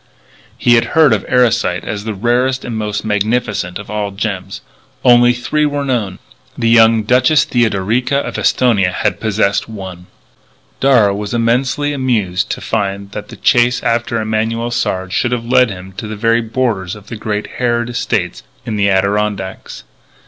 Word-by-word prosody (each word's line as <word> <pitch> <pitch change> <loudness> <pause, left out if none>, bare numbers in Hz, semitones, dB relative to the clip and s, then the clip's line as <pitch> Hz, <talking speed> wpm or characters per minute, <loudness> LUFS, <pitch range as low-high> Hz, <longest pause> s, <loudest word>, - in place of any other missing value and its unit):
He 120 - +3
had 115 -1 +4
heard 155 -7 +6
of 105 - -1
Erosite 120 -2 +2
as 105 -1 -5
the 110 -2 -3
rarest 125 +5 0
and 120 - -4
most 105 -1 -3
magnificent 105 -3 -1
of 105 0 -9
all 105 -1 -2
gems. 95 -1 -5 0.4
Only 120 -1 +6
three 125 +5 -1
were 145 -1 -2
known. 110 -8 -2 0.4
The 115 - +1
young 115 -1 +5
Duchess 125 +7 +3
Theodorica 120 +3 0
of 140 - -3
Esthonia 105 -8 +2
had - - -1
possessed 105 -1 0
one. 95 -4 -9 0.7
Darragh 115 -7 +4
was 105 +3 -4
immensely 130 +5 0
amused 110 -9 -1
to - - -4
find 100 -2 -3
that 105 0 -7
the - - -9
chase 120 0 +2
after 115 0 0
Emanuel 110 +2 -1
Sard 95 -5 -2
should 120 - 0
have 115 -1 -3
led 125 0 +4
him 95 -1 -8
to 110 - -5
the 110 - -5
very 115 +2 +2
borders 110 -6 -2
of 105 -1 -14
the 115 - -7
great 105 -1 -3
Harrod 120 -1 0
estate 120 -1 -2 0.2
in 110 -2 -3
the 100 -1 +2
Adirondacks. 100 0 -1
110 Hz, 165 wpm, -16 LUFS, 100-120 Hz, 0.7 s, heard